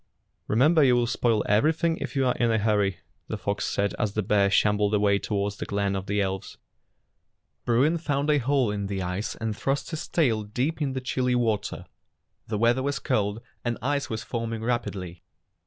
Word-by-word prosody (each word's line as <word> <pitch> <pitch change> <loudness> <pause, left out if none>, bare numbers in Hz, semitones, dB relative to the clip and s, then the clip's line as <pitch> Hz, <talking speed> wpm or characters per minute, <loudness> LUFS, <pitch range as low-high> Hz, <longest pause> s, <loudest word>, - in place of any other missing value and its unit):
"Remember 150 +8 +4
you 125 -2 +5
will 120 -1 +2
spoil 115 -2 +1
everything 160 - +2
if - - -5
you 135 -1 +2
are 125 - +3
in 120 - +3
a 110 - +2
hurry," 105 -3 +1 0.3
the - - -3
fox 100 0 -2
said 100 0 0
as 105 -2 0
the 110 - -1
bear 100 0 +3
shambled 105 +1 +3
away 100 -1 +3
toward 100 -1 -1
the - - -6
glen 100 -1 0
of 95 0 -4
the 105 +1 0
elves. 95 -1 -3 1.1
Bruin 135 +8 +3
found 145 -2 -1
a 150 - +3
hole 130 -3 +1
in 100 -1 -3
the 95 -1 -3
ice 90 +4 -3
and 110 -2 -3
thrust 135 +7 -2
his 160 - -4
tail 120 -10 +2
deep 125 +10 -2
in 140 -3 0
the 130 - -3
chilly 125 -1 0
water. 110 -4 -1 0.6
The 110 - -2
weather 120 +4 +3
was 140 +1 -1
cold, 105 -3 -1 0.2
and 120 -1 -1
ice 140 +3 -1
was 110 -1 -3
forming 115 -2 -4
rapidly. 95 -8 -3
110 Hz, 190 wpm, -26 LUFS, 100-130 Hz, 1.1 s, you